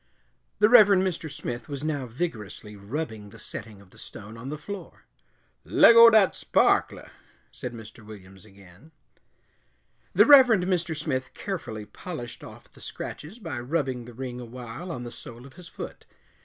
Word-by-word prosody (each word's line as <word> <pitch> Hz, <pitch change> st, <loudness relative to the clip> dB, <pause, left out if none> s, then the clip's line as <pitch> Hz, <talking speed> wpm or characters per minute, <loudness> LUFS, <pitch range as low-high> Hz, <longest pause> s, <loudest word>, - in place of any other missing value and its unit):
The 210 Hz, -, +5 dB
Reverend 205 Hz, -5 st, +7 dB
Mr. 175 Hz, -4 st, -3 dB
Smith 120 Hz, -4 st, -6 dB
was 140 Hz, -1 st, -5 dB
now 145 Hz, -4 st, -2 dB
vigorously 110 Hz, -, -5 dB
rubbing 110 Hz, 0 st, -6 dB
the -, -, -14 dB
setting 105 Hz, -2 st, -8 dB
of 100 Hz, -, -20 dB
the -, -, -16 dB
stone 110 Hz, +2 st, -10 dB
on 120 Hz, +4 st, -8 dB
the 150 Hz, -, -5 dB
floor. 200 Hz, +5 st, -9 dB, 0.6 s
"Leggo 230 Hz, 0 st, +8 dB
dat 215 Hz, -4 st, +5 dB
sparkler," -, -, +1 dB, 0.4 s
said 125 Hz, -, -7 dB
Mr. 115 Hz, 0 st, -12 dB
Williams 95 Hz, -3 st, -13 dB
again. 100 Hz, -, -18 dB, 1.2 s
The -, -, +6 dB
Reverend 255 Hz, -9 st, +7 dB
Mr. 175 Hz, -3 st, -1 dB
Smith 135 Hz, -4 st, -3 dB
carefully 115 Hz, -, -5 dB
polished 120 Hz, -4 st, -8 dB
off -, -, -13 dB
the -, -, -16 dB
scratches 160 Hz, +10 st, -8 dB
by 165 Hz, -, -6 dB
rubbing 130 Hz, -2 st, -2 dB
the 120 Hz, -, -11 dB
ring 125 Hz, -1 st, -6 dB
awhile 125 Hz, +8 st, -8 dB
on 125 Hz, -6 st, -5 dB
the 120 Hz, -, -7 dB
sole 120 Hz, +1 st, -11 dB
of 135 Hz, -, -14 dB
his 180 Hz, -1 st, -12 dB
foot. -, -, -9 dB
130 Hz, 155 wpm, -26 LUFS, 115-175 Hz, 1.2 s, Leggo